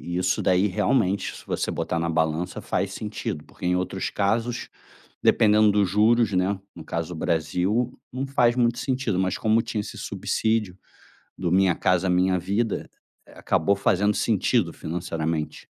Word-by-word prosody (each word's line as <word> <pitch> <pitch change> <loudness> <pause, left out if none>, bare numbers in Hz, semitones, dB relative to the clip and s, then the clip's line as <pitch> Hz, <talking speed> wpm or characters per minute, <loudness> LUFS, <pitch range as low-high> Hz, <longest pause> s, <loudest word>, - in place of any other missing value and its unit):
e - - 0
isso 90 -1 +1
daí 90 +2 +3
realmente 100 0 0
se - - -12
você - - -2
botar 85 - -2
na 85 0 -1
balança 80 +1 -1
faz - - -2
sentido 75 - -5
porque - - -10
em 90 - +2
outros 90 +1 -2
casos, 115 +4 -1 0.6
dependendo 105 0 +5
dos 100 -2 +2
juros, 110 +3 +3
né 95 +1 +1 0.2
no 80 - -10
caso, 85 +2 -4
o - - -7
Brasil 90 +9 0
não 130 +2 -3
faz 125 -3 +2
muito 120 -1 +2
sentido, 125 -8 -1
mas 95 -1 0
como 110 +1 +2
tinha 105 - -3
esse - - -7
subsídio 110 -5 -1 0.6
do 85 - -2
Minha 95 -1 +4
Casa 90 0 +1
Minha 90 +1 +2
Vida, 100 +5 -2 0.4
eh, - - -16
acabou 100 +6 +1
fazendo 100 +1 +2
sentido 105 -3 +1
financeiramente. 80 -2 -4
95 Hz, 160 wpm, -25 LUFS, 90-110 Hz, 0.6 s, dependendo